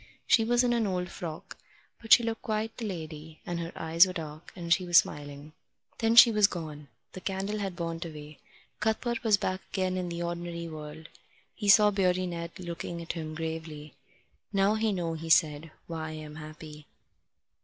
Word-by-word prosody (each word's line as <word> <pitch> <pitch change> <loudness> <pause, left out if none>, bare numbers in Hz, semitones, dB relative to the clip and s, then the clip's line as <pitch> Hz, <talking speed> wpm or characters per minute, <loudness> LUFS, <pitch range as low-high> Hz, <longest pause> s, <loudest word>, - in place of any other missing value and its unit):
She 225 - +5
was 240 +2 +3
in 245 -1 +2
an 230 -3 +1
old 180 -2 -2
frock, 160 -2 -7 0.4
but 225 -1 -10
she 235 - +9
looked 225 -1 -3
quite 220 0 -2
the 230 - -5
lady, 160 -3 -7
and 175 -1 -3
her 165 0 -4
eyes 165 +3 +5
were 185 - -5
dark, 155 -2 -7
and 170 -2 +1
she 185 - +1
was 175 -1 +4
smiling. 145 -2 0 0.5
Then 225 0 +2
she 235 0 +10
was 210 -2 +5
gone. 155 -5 -7 0.2
The 185 - -9
candle 195 +3 -3
had 195 -3 -3
burnt 165 -1 -4
away. 150 -2 -10 0.4
Cuthbert 230 +3 -1
was 215 -3 +4
back 185 -2 -2
again 185 -1 -1
in 180 -1 -2
the 170 0 -4
ordinary 170 0 -4
world. 155 0 -9 0.5
He 205 -2 -2
saw 210 +1 +7
Beardy 185 -2 +1
Ned 170 -1 -6
looking 170 -1 -5
at 170 - -5
him 155 -2 -6
gravely. 160 -2 -6 0.6
"Now 195 +1 +3
you 220 0 +1
know," 175 -4 -2
he 165 0 -6
said, 155 0 +3 0.2
"why 160 -2 -5
I'm 155 -1 -8
happy." 155 -1 -10
170 Hz, 185 wpm, -29 LUFS, 160-200 Hz, 0.6 s, she